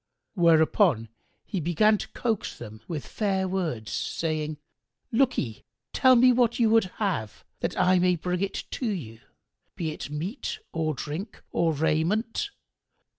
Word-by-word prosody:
Whereupon 165 - +4 0.4
he 195 - -3
began 185 +6 +3
to - - -5
coax 225 -4 -2
them 110 +1 -10
with 160 -5 -4
fair 195 -3 -1
words, 160 - -2
saying, 155 -2 -2 0.5
"Lookye, 225 - +1 0.3
tell 260 -1 +6
me 250 +1 +7
what 240 -1 +2
you 230 -3 +3
would 225 -2 +5
have, 175 - -2
that - - -2
I 185 0 +4
may 180 0 +3
bring 180 +2 -2
it 195 0 -2 0.2
you, 170 - -3 0.6
be 160 -3 -2
it 155 - -7
meat 160 - -4
or 155 -2 -1
drink 165 - -6
or 165 -1 +2
raiment." 175 - 0
180 Hz, 135 wpm, -27 LUFS, 155-215 Hz, 0.6 s, me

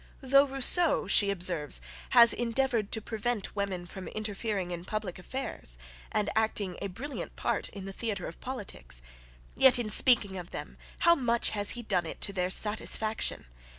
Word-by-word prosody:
"Though 275 +1 +4
Rousseau," 285 +4 +3
she 200 - +5
observes, 175 - +1 0.3
"has 235 0 +7
endeavoured 235 -2 -1
to 220 - -1
prevent 220 -2 -3
women 195 -3 -3
from 185 +1 -9
interfering 210 -3 -3
in 170 -1 -5
public 200 -2 -5
affairs, 180 - -4 0.3
and 210 - 0
acting 215 -4 0
a 200 - -2
brilliant 255 +10 -7
part - - -2
in 195 -2 -9
the 195 - -7
theatre 205 -4 -4
of 165 - -9
politics; 185 - -4 0.5
yet, 265 -2 +7
in 225 -3 -1
speaking 205 -4 +5
of 175 -1 -7
them, - - -8 0.2
how 340 - +6
much 240 -6 +1
has 205 -1 -1
he 240 - -6
done 175 -6 0
it - - -7
to 200 - +2
their 180 -1 -1
satisfaction! 215 - 0
210 Hz, 165 wpm, -29 LUFS, 185-240 Hz, 0.5 s, has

